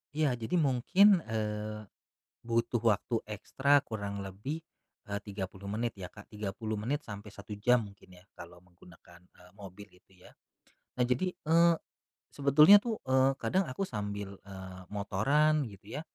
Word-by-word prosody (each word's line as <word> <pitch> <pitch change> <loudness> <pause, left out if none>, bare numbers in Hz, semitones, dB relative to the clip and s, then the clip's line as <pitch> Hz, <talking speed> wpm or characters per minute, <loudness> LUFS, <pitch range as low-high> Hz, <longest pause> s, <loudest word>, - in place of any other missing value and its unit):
Iya. 155 -4 +2
Jadi 115 +10 -2
mungkin, 175 +7 +4
eee, 105 -1 -3 0.6
butuh 115 0 0
waktu 115 +1 +1
ekstra 135 +7 +2
kurang 100 -2 -5
lebih, 105 +12 -6 0.4
eee, 100 0 -3
30 100 -1 -7
menit 115 +2 -2
ya 90 - -6
Kak, 100 +1 -15
30 105 +1 -4
menit 140 +8 -2
sampai 105 0 -9
1 100 +1 -9
jam 125 +2 +3
mungkin 100 -2 -16
ya - - -18
kalau 90 0 -12
menggunakan, 90 -1 -18
eee, 90 0 -20
mobil 100 0 -11
itu 90 0 -24
ya. - - -15 0.7
Nah, 125 - +4
jadi, 155 +9 0
eee, 170 +2 +4 0.6
sebetulnya 150 +8 +7
tuh, 230 -3 -3
eee, 130 +1 +4
kadang 190 +1 +1
aku 185 +9 -3
sambil, 100 -2 -5
eee, 95 -1 -9
motoran 140 +10 +2
gitu 100 +3 -11
ya. - - -4
105 Hz, 150 wpm, -31 LUFS, 100-140 Hz, 0.7 s, sebetulnya